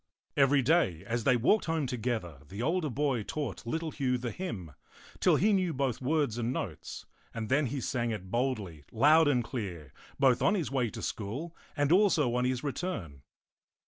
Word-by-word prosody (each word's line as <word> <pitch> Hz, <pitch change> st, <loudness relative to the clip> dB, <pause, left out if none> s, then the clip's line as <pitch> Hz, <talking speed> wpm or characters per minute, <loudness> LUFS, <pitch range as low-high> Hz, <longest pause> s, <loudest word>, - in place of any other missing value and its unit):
Every 135 Hz, -1 st, +4 dB
day, 120 Hz, -, +2 dB
as 120 Hz, 0 st, -2 dB
they 125 Hz, -2 st, +5 dB
walked 170 Hz, -, +3 dB
home 160 Hz, -3 st, 0 dB
together, 115 Hz, -, -3 dB
the 100 Hz, +5 st, -5 dB
older 160 Hz, +2 st, 0 dB
boy 135 Hz, -2 st, 0 dB
taught 120 Hz, -1 st, -5 dB
little 160 Hz, +5 st, -2 dB
Hugh 130 Hz, -3 st, 0 dB
the 120 Hz, -1 st, -4 dB
hymn, 110 Hz, -, -5 dB, 0.5 s
till -, -, +4 dB
he 210 Hz, +4 st, +3 dB
knew 185 Hz, -5 st, +1 dB
both 130 Hz, -3 st, -1 dB
words 140 Hz, -4 st, 0 dB
and 120 Hz, +1 st, -1 dB
notes; 95 Hz, -, -5 dB, 0.3 s
and 110 Hz, -1 st, -4 dB
then 140 Hz, +2 st, +3 dB
he 135 Hz, +4 st, -3 dB
sang 120 Hz, -2 st, -1 dB
it 95 Hz, -4 st, -5 dB
boldly, 110 Hz, -, -2 dB
loud 150 Hz, +7 st, +5 dB
and 125 Hz, -4 st, +2 dB
clear, 95 Hz, -, -6 dB, 0.2 s
both 130 Hz, -3 st, +4 dB
on 205 Hz, -, +3 dB
his 170 Hz, -9 st, -2 dB
way 125 Hz, -4 st, +1 dB
to -, -, -8 dB
school 130 Hz, +12 st, -4 dB, 0.2 s
and 145 Hz, +1 st, +2 dB
also 175 Hz, -, +4 dB
on 125 Hz, 0 st, +1 dB
his 125 Hz, 0 st, -1 dB
re 145 Hz, -, 0 dB
turn. 100 Hz, -, -5 dB
130 Hz, 185 wpm, -30 LUFS, 115-150 Hz, 0.5 s, they